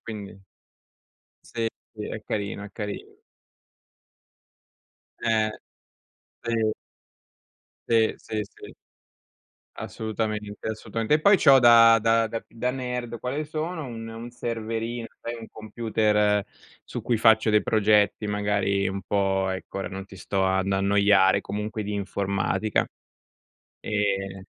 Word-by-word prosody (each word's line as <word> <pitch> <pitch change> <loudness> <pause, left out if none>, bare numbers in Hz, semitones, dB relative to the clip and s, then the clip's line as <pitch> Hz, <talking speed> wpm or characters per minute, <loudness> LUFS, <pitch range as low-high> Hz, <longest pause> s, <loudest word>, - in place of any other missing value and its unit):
Quindi. 105 -3 -8 1.0
Sì, 115 -1 -3 0.3
sì, 105 -2 -6
è 110 - -5
carino, 100 -1 -3
è 100 - -8
carino. 105 -1 -6 2.0
Eh, 110 -1 +2 0.9
sì. 115 -2 +1 1.2
Sì, 115 -1 +4
sì, 110 - -4
sì. 100 - -12 1.0
Assolutamente, 110 -1 -4
assolutamente. 110 +3 -2
E 155 - +3
poi 200 +3 +6
c'ho 135 -3 +7
da 115 -2 +8
da 115 +1 +3
da 115 +1 -5
da 125 +2 -2
nerd, 125 -2 -4
quale 140 +5 -3
sono, 155 +1 -4
un 115 -2 -7
un 115 +1 -8
serverino, 115 0 -3 0.2
sai 120 0 -4
un 115 -1 -9
computer, 105 -2 +1 0.4
su - - -6
cui 120 - +1
faccio 110 -1 +5
dei 105 0 +4
progetti, 105 -1 +3
magari 105 -1 0
un 95 0 -4
po 95 -1 +1
ecco, 95 +1 -5
ora 95 - -3
non 95 0 -7
ti 100 - -13
sto 95 +2 -1
ad 95 +1 +1
annoiare, 100 0 +4
comunque 105 +1 -4
di 105 +1 -4
informatica. 100 +1 -1 0.9
Ehm, 95 -2 -1
110 Hz, 120 wpm, -25 LUFS, 100-115 Hz, 2.0 s, da